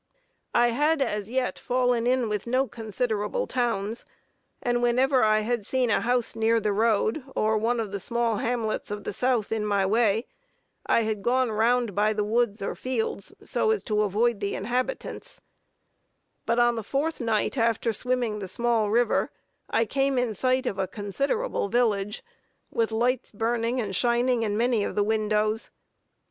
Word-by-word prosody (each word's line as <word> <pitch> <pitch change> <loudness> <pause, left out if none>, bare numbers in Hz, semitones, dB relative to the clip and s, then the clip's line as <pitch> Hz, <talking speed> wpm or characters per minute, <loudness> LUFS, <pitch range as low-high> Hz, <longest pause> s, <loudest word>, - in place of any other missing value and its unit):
I 240 0 +5
had 295 +6 +2
as 210 -6 -1
yet 255 +1 -1
fallen 245 -2 +1
in 250 -1 +2
with 210 0 -3
no 260 +3 +1
considerable 225 - -2
towns, 230 -3 -2 0.6
and 240 0 0
whenever 255 +2 +3
I 215 0 +4
had 235 0 -1
seen 250 +2 0
a - - +2
house 245 -1 0
near 225 +1 +2
the 210 -1 0
road, 220 +5 +1
or 215 +1 +2
one 230 +3 +1
of 215 -3 -3
the 200 - -3
small 235 +1 0
hamlets 230 -1 -2
of 205 0 -5
the - - -4
South 245 -2 0
in 220 -1 0
my 200 -2 +1
way, 220 +2 +2 0.6
I - - +4
had 215 -2 -2
gone 250 +2 +1
round 230 +1 +2
by 210 +2 +2
the 210 -1 0
woods 220 -1 0
or - - -2
fields, 230 -5 -3
so - - 0
as 440 -1 +1
to 210 -1 0
avoid 210 +2 +1
the 200 0 -2
inhabitants; 250 - -3 1.1
but 230 - +2
on 240 -1 +3
the 225 - -3
fourth 280 +7 -2
night 225 0 0
after 230 -1 +1
swimming 245 -3 -1
the 195 - -5
small 225 +2 0
river, 235 +3 +2 0.4
I 225 - +2
came 270 +3 0
in 245 -3 +1
sight 255 +5 +1
of 200 -5 -2
a 190 - 0
considerable 250 - -2
village, 210 -3 0 0.5
with 230 -1 0
lights 240 +3 0
burning 230 +3 -1
and 200 -5 -2
shining 240 +2 +2
through 210 -2 -1
many 235 -2 +2
of - - -3
the 205 - +3
windows. 215 +1 0
230 Hz, 170 wpm, -26 LUFS, 210-245 Hz, 1.1 s, I